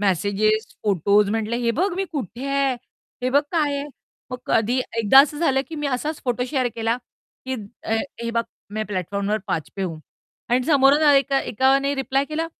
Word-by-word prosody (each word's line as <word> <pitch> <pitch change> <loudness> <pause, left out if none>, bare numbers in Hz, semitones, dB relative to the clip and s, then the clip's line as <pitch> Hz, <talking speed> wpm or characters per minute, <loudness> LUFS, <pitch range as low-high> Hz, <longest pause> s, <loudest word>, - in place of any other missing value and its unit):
Messages, 205 +3 +1 0.2
photos 200 +1 +3
म्हटले, 225 +1 -1
हे 235 - +2
बघ 380 +1 +1
मी 385 +2 -1
कुठे 260 - -5
आहे? 275 -1 +1 0.5
हे 255 - 0
बघ 280 +2 +5
काय 300 -4 +1
आहे? 280 +1 -4 0.4
मग 250 - -4
कधी 230 +3 +2 0.2
एकदा 230 +5 +8
असं 290 +1 0
झालं, 270 -5 +2
की 325 - -7
मी 295 -1 -2
असाच 285 +4 -2
फोटो 245 0 0
शेअर 260 -4 +1
केला, 230 +1 0 0.5
की 260 - -1 0.3
अ, 220 - -3 0.3
हे 235 - -2
बघ, 230 0 +1 0.3
मै 215 - -1
प्लॅटफॉर्म 200 +1 -2
नंबर 210 +1 +1
5 160 - -2
पे 195 - -2
हूं. 165 -4 -3 0.5
आणि 245 +1 +2
समोरून 285 0 +5
एका 275 0 +3
एकाने 275 +4 +2
रिप्लाय 270 0 0
केला, 310 +2 -3
255 Hz, 185 wpm, -22 LUFS, 215-280 Hz, 0.5 s, एकदा